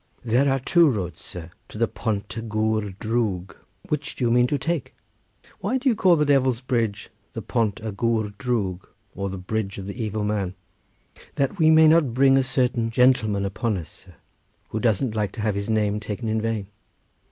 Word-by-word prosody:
"There 125 +4 +3
are 135 - +1
two 170 +4 +4
roads, 90 - -3
sir, 85 -2 -8 0.2
to - - -9
the 115 +1 +2
Pont 105 -4 -3
y 115 - -3
Gwr 110 -3 -1
Drwg; 105 -5 -2 0.3
which 150 -1 -2
do - - -4
you 120 - +2
mean 120 +1 +4
to 145 - 0
take?" 170 +4 -3 0.6
"Why 260 - 0
do 260 +1 +1
you 235 - +2
call 185 -5 +4
the 150 -2 +2
Devil's 130 -4 +3
Bridge 115 -5 -2 0.2
the 115 - -5
Pont 110 -2 0
y 110 - -3
Gwr 110 0 -1
Drwg, 105 -7 -1 0.3
or 100 0 -3
the 95 - -5
bridge 100 +2 -3
of 95 - -6
the 105 +4 -5
evil 110 0 -2
man?" 100 -3 -1 0.8
"That 140 +8 -1
we 160 -1 +5
may 160 0 +7
not 155 -7 +4
bring 135 +1 +5
a 135 - +5
certain 125 -3 0
gentleman 115 -5 +3
upon 100 +2 -1
us, 80 -3 -7
sir, - - -17 0.5
who 110 - -3
doesn't 115 +1 +1
like 105 -2 -1
to 110 - -6
have 105 -1 +1
his 100 +2 -4
name 105 -1 +1
taken 105 +2 -5
in 110 0 0
vain." 110 -2 -2
110 Hz, 200 wpm, -24 LUFS, 105-130 Hz, 0.8 s, may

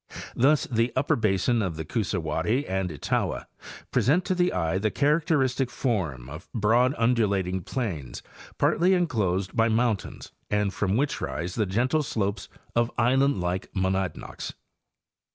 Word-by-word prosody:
Thus 145 +4 +3
the 115 0 0
upper 145 +4 +2
basin 110 +1 +1
of 90 -5 -2
the 80 0 -5
Coosawat 80 -4 -2
tee 130 +7 +1
and 95 -1 -2
Etowah 75 - -2 0.5
present 135 - +2
to - - +1
the 180 0 +2
eye 85 0 0
the 110 +2 +1
characteristic 140 -3 +1
form 90 - -2
of 75 +7 -10
broad 120 +5 +3
undulating 100 -6 +1
plains 85 - -4 0.3
partly 180 +3 +3
enclosed 105 - 0
by 115 0 +3
mountains 115 -2 -1 0.2
and 105 -1 +1
from 100 +1 0
which 145 +2 0
rise 85 +7 -3
the 105 -2 0
gentle 125 +10 +1
slopes 100 -7 -2 0.3
of 120 0 +2
island 130 -1 +3
like 90 +2 -2
monadnocks. 95 -3 -2
110 Hz, 140 wpm, -26 LUFS, 95-130 Hz, 0.5 s, Thus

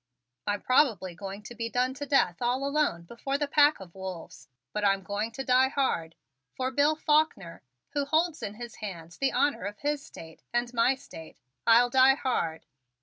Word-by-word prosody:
I'm 205 0 -1
probably 225 - +2
going 195 +3 -8
to 225 - -9
be 230 -1 -4
done 250 +2 0
to 285 +2 -6
death 215 - +2
all 250 +3 0
alone 280 - 0
before 235 +9 -3
the 290 0 -1
pack 290 +1 +4
of 180 -3 -12
wolves, 190 -3 -8 0.3
but 210 - -2
I'm 195 -1 +2
going 205 +3 -3
to 270 - -4
die 260 0 +4
hard 165 - -1 0.4
for 260 0 -1
Bill 290 +3 +3
Faulkner, 300 - +1 0.3
who 285 -1 -1
holds 320 +2 +1
in 205 - -5
his 235 0 -9
hand 170 -6 -7
the 275 - +2
honor 285 +3 +1
of 205 +1 -5
his 290 0 -2
State 165 - -12
and 240 +1 -1
my 245 +3 +3
State, 165 - -12 0.3
I'll 240 +1 +6
die 265 +1 +6
hard!" 170 - -2
245 Hz, 185 wpm, -28 LUFS, 195-275 Hz, 0.4 s, I'll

